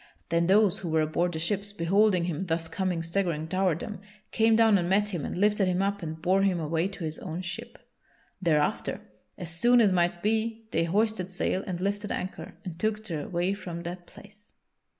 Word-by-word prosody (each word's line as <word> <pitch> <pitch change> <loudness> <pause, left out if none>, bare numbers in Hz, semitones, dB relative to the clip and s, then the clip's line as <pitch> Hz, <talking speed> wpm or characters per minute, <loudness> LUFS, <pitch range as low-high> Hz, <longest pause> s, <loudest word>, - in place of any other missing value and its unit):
Then 170 0 +2
those 200 0 +4
who 175 - -5
were 160 0 +2
aboard 170 +3 0
the - - -3
ships, 200 +5 -1
beholding 190 +1 +3
him 175 +2 -3
thus 165 0 -1
coming 175 0 -2
staggering 165 -2 -1
toward 185 -2 +1
them, 210 -3 -6 0.3
came 225 0 +4
down 220 -3 +5
and 175 0 -1
met 205 +2 +3
him 175 -7 -3
and - - -4
lifted 205 0 +3
him 185 +1 +1
up 200 0 -1
and 160 -1 -5
bore 185 +4 +2
him 190 -3 +2
away 165 +2 0
to 195 -2 -8
his 155 0 -3
own 175 0 -5
ship. 175 -2 -7 0.6
Thereafter, 155 -4 +1 0.4
as 175 -1 -6
soon 240 +9 +4
as 210 -4 +5
might 175 -1 +1
be 225 +1 0
they 165 +1 +1
hoisted 205 +1 0
sail 190 0 -1
and 180 -2 -3
lifted 205 +2 -2
anchor 185 - -5
and 175 -2 -7
took 215 0 -1
their 160 -7 -4
way 180 +2 0
from 175 -4 -6
that 175 0 -7
place. 205 +1 -17
185 Hz, 200 wpm, -28 LUFS, 170-205 Hz, 0.6 s, down